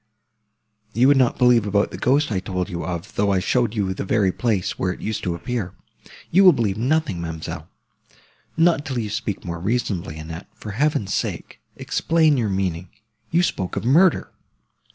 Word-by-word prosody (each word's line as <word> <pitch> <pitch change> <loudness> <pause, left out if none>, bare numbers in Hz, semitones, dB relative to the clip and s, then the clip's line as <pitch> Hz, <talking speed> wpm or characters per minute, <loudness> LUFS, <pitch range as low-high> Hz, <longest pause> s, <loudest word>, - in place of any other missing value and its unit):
You 125 +3 +5
would 140 - +5
not 130 -2 +2
believe 120 -4 +4
about 100 0 +1
the - - -7
ghost 140 +1 +2
I 95 - 0
told 90 0 -3
you 85 -1 -4
of, 85 -2 -5
though 100 0 +1
I 95 - +2
showed 120 +4 0
you 95 -3 0
the - - -4
very 100 -1 +2
place, 105 -3 -1
where 95 - 0
it - - -8
used 110 -1 -3
to 85 -2 -2
appear!—You 120 - -3
will 185 -2 +8
believe 110 -7 0
nothing, 125 - 0
ma'amselle." 80 -1 -6 0.9
"Not 165 -2 +3
till 130 -3 -4
you 110 -3 -3
speak 105 -2 -4
more 85 -1 -4
reasonably, 95 -6 -2
Annette; 80 +3 -8
for 105 - -8
Heaven's 115 -4 0
sake, - - -4 0.2
explain 160 -2 +2
your 115 -5 0
meaning. 95 -2 -2 0.4
You 175 +2 +2
spoke 95 - -2
of 100 - -3
murder!" 165 +8 +3
105 Hz, 175 wpm, -22 LUFS, 90-130 Hz, 0.9 s, will